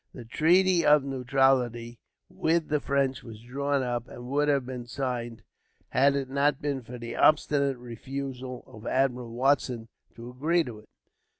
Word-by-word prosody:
The 120 Hz, -, -9 dB
treaty 175 Hz, +7 st, +3 dB
of 150 Hz, -1 st, +5 dB
neutrality 125 Hz, -3 st, +1 dB, 0.3 s
with 160 Hz, 0 st, 0 dB
the 150 Hz, 0 st, +1 dB
French 140 Hz, -2 st, 0 dB
was 110 Hz, -2 st, -11 dB
drawn 140 Hz, +3 st, -1 dB
up, 120 Hz, -1 st, -3 dB
and 120 Hz, -, -10 dB
would 145 Hz, +1 st, +2 dB
have 140 Hz, -3 st, +2 dB
been 125 Hz, -2 st, -6 dB
signed, 120 Hz, -3 st, -4 dB, 0.5 s
had 140 Hz, +2 st, +3 dB
it 135 Hz, -1 st, -2 dB
not 140 Hz, +1 st, +1 dB
been 140 Hz, -2 st, -2 dB
for 125 Hz, +1 st, -9 dB
the 115 Hz, -1 st, -6 dB
obstinate 140 Hz, -3 st, +3 dB
refusal 130 Hz, +1 st, -6 dB
of 110 Hz, 0 st, -11 dB
Admiral 125 Hz, -2 st, 0 dB
Watson 125 Hz, -2 st, 0 dB, 0.3 s
to 120 Hz, +1 st, -9 dB
agree 160 Hz, +7 st, +1 dB
to 115 Hz, -6 st, -8 dB
it. 105 Hz, -, -20 dB
130 Hz, 160 wpm, -27 LUFS, 120-140 Hz, 0.5 s, of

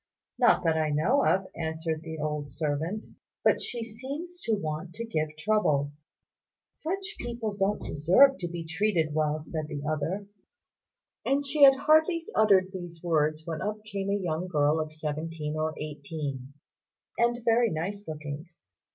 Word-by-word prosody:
"Not -, -, +5 dB
that 160 Hz, -2 st, +2 dB
I 155 Hz, -1 st, +1 dB
know 170 Hz, -, +3 dB
of," 190 Hz, +1 st, +3 dB
answered 160 Hz, -1 st, -2 dB
the 160 Hz, 0 st, -6 dB
old 150 Hz, -1 st, -3 dB
servant; 155 Hz, -, -2 dB, 0.4 s
"but -, -, +4 dB
she 235 Hz, -1 st, -4 dB
seems 280 Hz, +11 st, -7 dB
to 225 Hz, -, +2 dB
want 160 Hz, -1 st, -4 dB
to 230 Hz, -, -4 dB
give 155 Hz, -8 st, -2 dB
trouble." 155 Hz, -7 st, +2 dB, 0.9 s
"Such 385 Hz, +5 st, -3 dB
people 235 Hz, -3 st, -3 dB
don't 200 Hz, +1 st, +1 dB
deserve 185 Hz, -, +5 dB
to 175 Hz, -, -2 dB
be 170 Hz, -1 st, -5 dB
treated 165 Hz, -2 st, +1 dB
well," 155 Hz, 0 st, 0 dB
said 155 Hz, -1 st, -4 dB
the 145 Hz, -2 st, -5 dB
other; 160 Hz, +6 st, -1 dB, 1.0 s
and 280 Hz, +1 st, +1 dB
she 285 Hz, +2 st, -1 dB
had 270 Hz, -1 st, +10 dB
hardly 315 Hz, +4 st, +3 dB
uttered 195 Hz, -3 st, +4 dB
these 175 Hz, -3 st, -8 dB
words 155 Hz, -2 st, +1 dB
when 160 Hz, -2 st, -4 dB
up 210 Hz, 0 st, -3 dB
came 200 Hz, -2 st, -3 dB
a 200 Hz, -, +2 dB
young 175 Hz, -2 st, -2 dB
girl 150 Hz, -2 st, +2 dB
of 155 Hz, -1 st, -3 dB
seventeen 155 Hz, 0 st, -4 dB
or 155 Hz, 0 st, -1 dB
eighteen, 145 Hz, -3 st, -5 dB, 0.7 s
and 240 Hz, 0 st, +1 dB
very 235 Hz, 0 st, +4 dB
nice 195 Hz, +5 st, -3 dB
looking. 155 Hz, +1 st, -6 dB
165 Hz, 155 wpm, -28 LUFS, 155-215 Hz, 1.0 s, had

